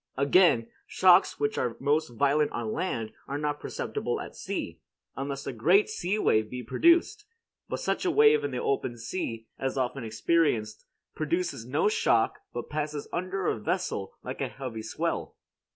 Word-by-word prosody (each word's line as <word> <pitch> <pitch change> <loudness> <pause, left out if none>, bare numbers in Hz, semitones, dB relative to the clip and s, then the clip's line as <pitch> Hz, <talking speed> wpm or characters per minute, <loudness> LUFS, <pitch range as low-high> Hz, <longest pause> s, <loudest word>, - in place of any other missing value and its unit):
Again, 140 -4 +4 0.2
shocks 185 0 +5
which 215 0 0
are 120 - -1
most 150 +3 +1
violent 140 +5 +2
on 115 -2 -3
land 115 -11 -2 0.2
are 140 - -3
not 145 0 -2
perceptible - - -3
at - - -8
sea, - - -5 0.4
unless 135 +1 -4
a - - -3
great 175 - +4
sea 200 -1 -1
wave 110 - +2
be 125 +1 -6
produced; 340 - +3 0.4
but - - -3
such - - -1
a 370 - +2
wave 440 +4 +5
in 430 - -1
the - - -4
open 410 - -1
sea, 115 -3 -4
as 135 0 -2
often 130 0 -1
experienced, 110 -1 0 0.3
produces 165 -6 -2
no 145 +9 +2
shock 115 - +2
but 120 - -5
passes 150 -1 -3
under 185 +2 -2
a 115 - 0
vessel 105 - -2
like - - -6
a - - 0
heavy 125 -5 -6
swell. 110 - -3
145 Hz, 165 wpm, -28 LUFS, 120-185 Hz, 0.4 s, shocks